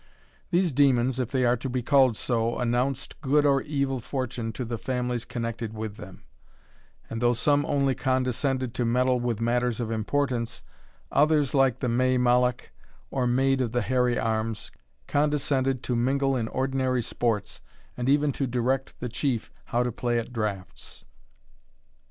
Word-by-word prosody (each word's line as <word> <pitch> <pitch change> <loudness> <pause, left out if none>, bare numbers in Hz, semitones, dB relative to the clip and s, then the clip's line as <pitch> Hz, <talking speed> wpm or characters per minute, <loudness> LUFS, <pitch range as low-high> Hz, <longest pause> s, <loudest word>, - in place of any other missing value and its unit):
These 175 -1 +2
demons, 130 -2 +3
if 125 -3 -1
they 130 -2 +1
are 120 0 +4
to 130 +3 -4
be 125 -1 -2
called 130 -4 +4
so, 115 -1 0
announced 125 +4 -1
good 145 +1 +3
or 140 -1 +4
evil 140 -3 -1
fortune 120 -2 -3
to 125 - -4
the 115 -1 -4
families 125 -2 -2
connected 115 -2 -4
with 110 -1 -5
them; 95 - -11 0.8
and 115 - -5
though 120 0 +4
some 145 +5 +2
only 140 -2 +2
condescended 130 0 0
to 120 - -1
meddle 125 +2 +2
with 120 -3 -1
matters 120 +1 0
of 115 -2 -2
importance, 120 +1 -1 0.5
others, 150 -1 +3
like 135 -3 +3
the 130 - 0
May 130 +2 +2
Mollach, 125 0 +2 0.4
or 125 -2 0
Maid 135 +2 +2
of 120 -2 -2
the 120 -2 +1
Hairy 125 +1 +1
Arms, 110 -1 -2 0.3
condescended 140 -3 +1
to 125 - -1
mingle 135 +3 +1
in 115 -3 -1
ordinary 130 -1 0
sports, 110 -3 -2 0.3
and 125 +1 -1
even 145 +1 +3
to 135 0 -2
direct 125 +2 -1
the 125 - -2
Chief 120 -1 -2
how 120 -1 0
to 125 - -1
play 120 +1 -1
at 115 +1 -4
draughts. 105 -5 -5
125 Hz, 160 wpm, -26 LUFS, 120-135 Hz, 0.8 s, are